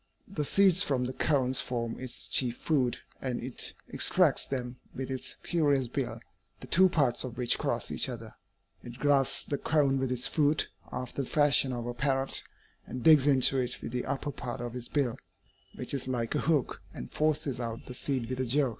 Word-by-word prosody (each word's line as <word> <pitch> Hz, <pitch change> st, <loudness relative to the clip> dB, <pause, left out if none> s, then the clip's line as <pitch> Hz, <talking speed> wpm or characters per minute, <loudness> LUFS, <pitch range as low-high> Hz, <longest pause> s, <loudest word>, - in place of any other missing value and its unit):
The 165 Hz, -6 st, -3 dB
seeds 190 Hz, +2 st, +4 dB
from 135 Hz, -8 st, +1 dB
the 130 Hz, -, -4 dB
cones 130 Hz, -3 st, +2 dB
form 115 Hz, -2 st, -3 dB
its 130 Hz, -2 st, -5 dB
chief 125 Hz, -2 st, +1 dB
food, 130 Hz, -7 st, +1 dB, 0.2 s
and 125 Hz, -2 st, -2 dB
it 125 Hz, 0 st, -5 dB
extracts -, -, +3 dB
them 125 Hz, -2 st, -4 dB, 0.2 s
with 135 Hz, 0 st, -4 dB
its 130 Hz, -, -4 dB
curious 145 Hz, -6 st, +1 dB
bill, 130 Hz, +1 st, -3 dB, 0.4 s
the -, -, -9 dB
two 185 Hz, +2 st, +5 dB
parts 140 Hz, -8 st, +1 dB
of 125 Hz, -2 st, -7 dB
which 125 Hz, -2 st, +1 dB
cross -, -, -2 dB
each -, -, +2 dB
other. -, -, -7 dB, 0.5 s
It 120 Hz, 0 st, -9 dB
grasps 135 Hz, -2 st, +2 dB
the 145 Hz, -, -3 dB
cone 140 Hz, -3 st, +2 dB
with 130 Hz, -1 st, -1 dB
its 125 Hz, -1 st, 0 dB
foot, 150 Hz, 0 st, +2 dB, 0.2 s
after 125 Hz, +2 st, -4 dB
the 130 Hz, -, -6 dB
fashion 145 Hz, -3 st, +3 dB
of 120 Hz, -2 st, -4 dB
a 120 Hz, -, -3 dB
parrot, 135 Hz, +1 st, +2 dB, 0.5 s
and 125 Hz, 0 st, -6 dB
digs 150 Hz, -3 st, +7 dB
into 135 Hz, -1 st, +5 dB
it 125 Hz, -1 st, -2 dB
with -, -, -5 dB
the 125 Hz, 0 st, -2 dB
upper 140 Hz, +2 st, -3 dB
part 125 Hz, -1 st, -6 dB
of 120 Hz, 0 st, -5 dB
its 125 Hz, -1 st, -5 dB
bill, 135 Hz, -6 st, 0 dB, 0.6 s
which -, -, -4 dB
is 135 Hz, -2 st, -2 dB
like 120 Hz, -3 st, -2 dB
a -, -, +1 dB
hook, 155 Hz, -6 st, 0 dB
and 65 Hz, -, -8 dB
forces 150 Hz, -4 st, 0 dB
out 115 Hz, -1 st, -5 dB
the 125 Hz, -, -8 dB
seed 130 Hz, -1 st, -2 dB
with 130 Hz, +1 st, -4 dB
a 130 Hz, -, 0 dB
jerk.'" 135 Hz, +2 st, +2 dB
130 Hz, 200 wpm, -30 LUFS, 125-145 Hz, 0.6 s, digs